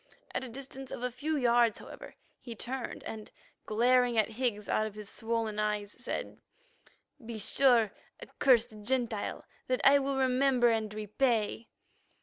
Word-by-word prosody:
At -, -, -2 dB
a 260 Hz, -, -6 dB
distance 270 Hz, +2 st, -8 dB
of 245 Hz, -, -6 dB
a 250 Hz, -, -1 dB
few 305 Hz, +5 st, -2 dB
yards, 235 Hz, -3 st, +3 dB
however, -, -, -11 dB, 0.2 s
he 235 Hz, -2 st, -8 dB
turned, 250 Hz, +3 st, -5 dB
and, 215 Hz, -1 st, -7 dB, 0.4 s
glaring 245 Hz, +2 st, +3 dB
at 215 Hz, -1 st, +3 dB
Higgs 225 Hz, -3 st, -2 dB
out 215 Hz, -, +1 dB
of 210 Hz, -, -10 dB
his 210 Hz, 0 st, -8 dB
swollen 225 Hz, -2 st, -2 dB
eyes, 210 Hz, -1 st, -1 dB
said: 250 Hz, -, -6 dB, 0.8 s
"Be 225 Hz, 0 st, -6 dB
sure, 230 Hz, 0 st, +3 dB, 0.3 s
accursed 230 Hz, -5 st, +2 dB
Gentile, 235 Hz, -2 st, -2 dB, 0.2 s
that 255 Hz, 0 st, 0 dB
I 280 Hz, +1 st, +7 dB
will 275 Hz, 0 st, -1 dB
remember 260 Hz, -1 st, +3 dB
and 220 Hz, -2 st, 0 dB
repay." 215 Hz, +1 st, 0 dB
235 Hz, 145 wpm, -31 LUFS, 215-255 Hz, 0.8 s, I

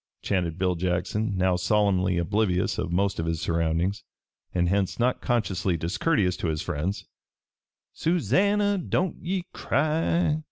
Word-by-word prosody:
chanted 90 Hz, -4 st, -1 dB
Bill 90 Hz, -1 st, +1 dB
Jackson, 90 Hz, +4 st, -1 dB
now 95 Hz, 0 st, +2 dB
solemnly 95 Hz, -1 st, +2 dB
oblivious 90 Hz, +1 st, 0 dB
of 85 Hz, -, -2 dB
most 95 Hz, +1 st, 0 dB
of 80 Hz, -, -2 dB
his 80 Hz, -1 st, -1 dB
surroundings 85 Hz, +4 st, 0 dB, 0.5 s
and 90 Hz, -1 st, +1 dB
hence 95 Hz, +1 st, 0 dB
not 125 Hz, +1 st, +1 dB
consciously 95 Hz, -6 st, 0 dB
discourteous 90 Hz, -, +1 dB
to -, -, -2 dB
his 80 Hz, +1 st, -1 dB
friends; 90 Hz, +3 st, -3 dB, 0.9 s
"Susannah, 195 Hz, -, +2 dB
don't 180 Hz, 0 st, -1 dB
ye 180 Hz, +1 st, -1 dB
cry!" 155 Hz, +2 st, +1 dB
95 Hz, 130 wpm, -26 LUFS, 90-120 Hz, 0.9 s, now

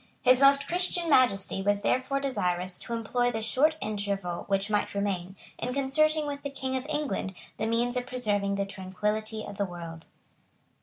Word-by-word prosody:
His 255 Hz, +1 st, +5 dB
Most 275 Hz, 0 st, +6 dB
Christian 355 Hz, -1 st, 0 dB
Majesty 195 Hz, -8 st, +3 dB
was 205 Hz, +1 st, +1 dB
therefore 260 Hz, +2 st, +1 dB
desirous 180 Hz, -9 st, -1 dB
to 235 Hz, -, -4 dB
employ 245 Hz, +2 st, 0 dB
the 225 Hz, -2 st, -3 dB
short 295 Hz, +8 st, +3 dB
interval 200 Hz, -4 st, -2 dB
which 195 Hz, 0 st, +1 dB
might 210 Hz, -1 st, 0 dB
remain, 190 Hz, -2 st, -2 dB, 0.2 s
in 250 Hz, +2 st, -3 dB
concerting 310 Hz, +3 st, +2 dB
with 285 Hz, -1 st, -4 dB
the 280 Hz, -, -4 dB
King 265 Hz, -1 st, -3 dB
of 260 Hz, +2 st, -3 dB
England 295 Hz, -10 st, -2 dB, 0.2 s
the 220 Hz, -, -1 dB
means 240 Hz, +2 st, +1 dB
of 250 Hz, 0 st, -2 dB
preserving 205 Hz, -6 st, 0 dB
the 200 Hz, 0 st, 0 dB
tranquillity 210 Hz, +3 st, -3 dB
of 200 Hz, -, -8 dB
the 200 Hz, -, +1 dB
world. 170 Hz, -2 st, -8 dB
220 Hz, 170 wpm, -28 LUFS, 195-270 Hz, 0.2 s, Most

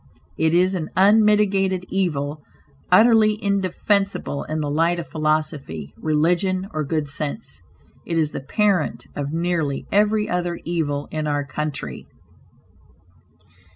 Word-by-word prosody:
It 160 Hz, -, +2 dB
is 185 Hz, +2 st, +3 dB
an 165 Hz, -4 st, -3 dB
unmitigated 200 Hz, -2 st, +4 dB
evil, 150 Hz, -6 st, -1 dB, 0.5 s
utterly 215 Hz, +1 st, +5 dB
indefensible 200 Hz, -4 st, 0 dB
in 155 Hz, 0 st, -3 dB
the 150 Hz, -, -2 dB
light 165 Hz, +3 st, +2 dB
of 170 Hz, -, -4 dB
philosophy; 155 Hz, -, -2 dB
religion 180 Hz, +5 st, +1 dB
or 155 Hz, 0 st, -1 dB
good 150 Hz, 0 st, -1 dB
sense. 145 Hz, +8 st, -5 dB, 0.4 s
It 165 Hz, -, -2 dB
is 155 Hz, -2 st, +1 dB
the -, -, -5 dB
parent 190 Hz, +3 st, 0 dB
of 145 Hz, 0 st, -3 dB
nearly 165 Hz, -4 st, -1 dB
every 210 Hz, +1 st, +2 dB
other 175 Hz, -1 st, -2 dB
evil 150 Hz, -4 st, -2 dB
in 155 Hz, -1 st, -2 dB
our 145 Hz, -1 st, -1 dB
country. 140 Hz, -, -5 dB
165 Hz, 120 wpm, -22 LUFS, 150-195 Hz, 0.5 s, utterly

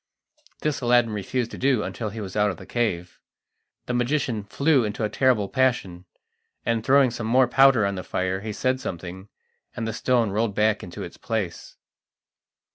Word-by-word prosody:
This 150 Hz, -2 st, -1 dB
Aladdin 120 Hz, -2 st, +3 dB
refused 115 Hz, +4 st, -2 dB
to -, -, -8 dB
do 130 Hz, -5 st, +2 dB
until 110 Hz, -3 st, -4 dB
he 110 Hz, +3 st, -7 dB
was 95 Hz, -3 st, -6 dB
out 105 Hz, 0 st, +3 dB
of 90 Hz, -, -5 dB
the -, -, -11 dB
cave. 90 Hz, -8 st, -2 dB, 0.7 s
The 125 Hz, -, -3 dB
magician 120 Hz, -2 st, 0 dB
flew 140 Hz, +6 st, +2 dB
into 105 Hz, +1 st, -3 dB
a 105 Hz, -, 0 dB
terrible 115 Hz, -3 st, +2 dB
passion, 110 Hz, -9 st, 0 dB, 0.6 s
and 115 Hz, -1 st, 0 dB
throwing 135 Hz, 0 st, +4 dB
some 115 Hz, -1 st, -4 dB
more 125 Hz, +2 st, +4 dB
powder 130 Hz, -3 st, +5 dB
on 100 Hz, -, 0 dB
the 95 Hz, -1 st, -5 dB
fire, 95 Hz, +1 st, -2 dB
he 110 Hz, +1 st, -4 dB
said 130 Hz, +5 st, 0 dB
something, 90 Hz, +3 st, -7 dB, 0.5 s
and 115 Hz, -, -3 dB
the 110 Hz, -, -3 dB
stone 120 Hz, -2 st, +1 dB
rolled 105 Hz, 0 st, 0 dB
back 105 Hz, 0 st, +2 dB
into 90 Hz, -, -7 dB
its -, -, -9 dB
place. 110 Hz, -7 st, -4 dB
110 Hz, 180 wpm, -24 LUFS, 100-125 Hz, 0.7 s, powder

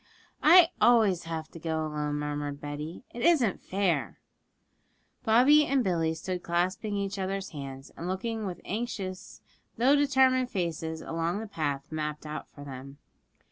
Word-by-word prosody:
'I 335 Hz, +1 st, +8 dB
always 215 Hz, -8 st, +4 dB
have 160 Hz, -1 st, -4 dB
to 165 Hz, -, -11 dB
go 160 Hz, -1 st, -2 dB
alone,' 150 Hz, -1 st, -2 dB
murmured 145 Hz, -1 st, -3 dB
Betty; 150 Hz, -, -6 dB
'it 240 Hz, -, -7 dB
isn't 285 Hz, -, +3 dB
fair.' 180 Hz, -, 0 dB, 1.1 s
Bobby 255 Hz, +7 st, +6 dB
and 270 Hz, -2 st, +2 dB
Billy 165 Hz, -4 st, 0 dB
stood 180 Hz, +2 st, -4 dB
clasping 185 Hz, +5 st, -1 dB
each 200 Hz, 0 st, -3 dB
other's 195 Hz, +1 st, -3 dB
hands, 135 Hz, -3 st, -8 dB
and 170 Hz, -, -6 dB
looking 215 Hz, +3 st, -2 dB
with 180 Hz, -2 st, -6 dB
anxious 200 Hz, -4 st, -5 dB, 0.4 s
though 260 Hz, +5 st, +5 dB
determined 265 Hz, -3 st, +3 dB
faces 160 Hz, -4 st, -3 dB
along 165 Hz, +3 st, -2 dB
the 225 Hz, -, -5 dB
path 145 Hz, -9 st, -3 dB
mapped 150 Hz, -1 st, -4 dB
out 150 Hz, 0 st, -6 dB
for 145 Hz, -, -12 dB
them. 135 Hz, 0 st, -9 dB
175 Hz, 145 wpm, -29 LUFS, 155-220 Hz, 1.1 s, I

